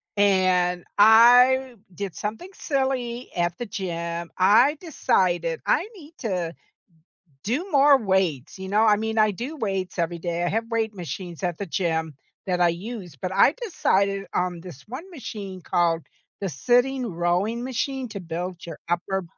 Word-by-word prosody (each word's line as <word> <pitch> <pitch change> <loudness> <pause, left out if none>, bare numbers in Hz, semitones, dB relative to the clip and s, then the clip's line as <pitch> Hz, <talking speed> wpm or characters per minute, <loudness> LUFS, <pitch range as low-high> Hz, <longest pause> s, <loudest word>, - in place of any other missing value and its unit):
And 185 -3 +2
I 245 +4 +6 0.2
did 195 0 -5
something 225 - -5
silly 265 -5 -2
at 175 -1 0
the 240 - -4
gym, 170 -4 -4
I 230 +11 +5
decided 175 - 0
I 370 - +2
need 320 -3 -14
to 180 -7 -2 0.9
do 300 - -2
more 280 0 +6
weights. 190 - -1
You 190 - -6
know? 210 +2 +3
I 215 -2 +5
mean, 220 +1 -3
I 215 -1 +4
do 250 - -6
weights 195 -6 -3
every 170 0 -1
day. 170 0 -2
I 175 - +1
have 225 +1 -2
weight 225 -2 -1
machines 175 -1 -7
at 175 -3 -2
the 200 - -4
gym 160 -3 -1 0.3
that 180 -2 0
I 175 - +6
use, 180 - -6
but 185 +6 -3
I 200 +9 +5
decided 195 - 0
on 180 -1 -1
this 165 -6 -11
one 290 - -8
machine 205 - -7
called 170 -2 0 0.4
the 195 - -1
sitting 245 - +1
rowing 180 +6 -1
machine 260 +1 -2
to 205 - -6
build 175 +1 -5
your 165 - -7
upper 185 +2 -1
195 Hz, 160 wpm, -24 LUFS, 175-240 Hz, 0.9 s, I